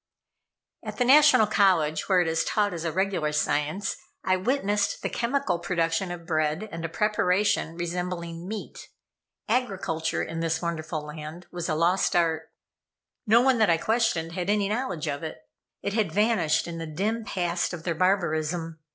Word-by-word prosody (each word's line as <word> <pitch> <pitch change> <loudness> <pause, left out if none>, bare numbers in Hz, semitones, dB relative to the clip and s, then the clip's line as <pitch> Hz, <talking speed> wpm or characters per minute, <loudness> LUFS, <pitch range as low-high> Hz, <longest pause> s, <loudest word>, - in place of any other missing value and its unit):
At - - -6
the 245 - +2
National 290 -3 +7
College, 185 -8 +2
where 185 -2 +5
it 175 - 0
is 160 0 +1
taught 205 -2 0
as 170 -1 -5
a 165 - 0
regular 185 -4 0
science, 150 +5 -1 0.3
I 185 - +2
witnessed 205 0 0
the - - -2
chemical 235 -7 0
production 170 +1 0
of 175 -1 -7
bread 155 +5 0
and 165 0 -6
a 165 - -2
preparation 195 -3 +1
resembling 175 0 -4
meat. 215 +1 -7 0.6
Agriculture 195 -9 -1
in 165 0 -5
this 165 -1 0
wonderful 160 -2 -3
land, 155 +3 -8
was 175 -1 -4
a 155 - +1
lost 175 +4 +2
art. 160 -2 +1 0.8
No 230 +3 +6
one 260 -2 +3
that 215 - +4
I 165 - +4
questioned 220 -5 0
had 180 +2 -3
any 205 -1 +2
knowledge 210 - -2
of 145 -2 -3
it. 160 -5 -6 0.5
It 200 - -2
had 220 -1 +1
vanished 195 -8 +2
in 165 -1 -6
the 165 - -5
dim 210 +9 -2
past 175 -4 -1
of 175 -3 -7
their 170 - -1
barbarism. 165 -2 0
175 Hz, 170 wpm, -26 LUFS, 160-205 Hz, 0.8 s, National